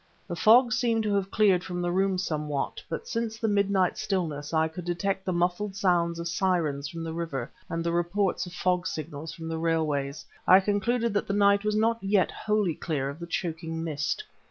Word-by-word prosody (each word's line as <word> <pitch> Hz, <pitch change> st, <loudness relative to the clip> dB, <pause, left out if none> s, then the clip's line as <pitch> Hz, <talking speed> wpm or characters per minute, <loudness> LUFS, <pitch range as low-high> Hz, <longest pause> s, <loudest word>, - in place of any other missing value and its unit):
The 175 Hz, -, -4 dB
fog 240 Hz, +7 st, +6 dB
seemed 230 Hz, -3 st, +1 dB
to 210 Hz, -1 st, 0 dB
have 195 Hz, -1 st, 0 dB
cleared 195 Hz, -5 st, +3 dB
from 180 Hz, -1 st, -4 dB
the 175 Hz, 0 st, 0 dB
room 190 Hz, +1 st, +1 dB
somewhat, 150 Hz, -5 st, -2 dB
but 165 Hz, -, -4 dB
since 230 Hz, -1 st, -2 dB
in -, -, -15 dB
the 220 Hz, -3 st, +1 dB
midnight 200 Hz, -2 st, +2 dB
stillness 160 Hz, -7 st, -2 dB
I 160 Hz, -1 st, +2 dB
could 175 Hz, +3 st, -8 dB
detect 185 Hz, +3 st, -2 dB
the 185 Hz, -, 0 dB
muffled 180 Hz, +3 st, 0 dB
sounds 175 Hz, -3 st, +2 dB
of 170 Hz, 0 st, -4 dB
sirens 165 Hz, -5 st, 0 dB
from 165 Hz, -1 st, -6 dB
the 165 Hz, -1 st, -4 dB
river 150 Hz, -7 st, -4 dB, 0.2 s
and 165 Hz, 0 st, -2 dB
the 170 Hz, -, 0 dB
reports 175 Hz, +3 st, 0 dB
of -, -, -9 dB
fog 180 Hz, 0 st, 0 dB
signals 155 Hz, 0 st, -5 dB
from 165 Hz, -1 st, -8 dB
the 160 Hz, 0 st, -3 dB
railways, 155 Hz, -4 st, -1 dB, 0.2 s
I 185 Hz, -, +9 dB
concluded 220 Hz, +4 st, 0 dB
that 205 Hz, -, 0 dB
the 200 Hz, -, -1 dB
night 200 Hz, 0 st, +4 dB
was 210 Hz, 0 st, 0 dB
not 225 Hz, +2 st, +2 dB
yet 195 Hz, -1 st, +2 dB
wholly 210 Hz, -5 st, 0 dB
clear 145 Hz, -4 st, -2 dB
of 145 Hz, -, -11 dB
the 170 Hz, -, -6 dB
choking 165 Hz, -1 st, -3 dB
mist. 155 Hz, -, -2 dB
175 Hz, 205 wpm, -27 LUFS, 165-200 Hz, 0.2 s, I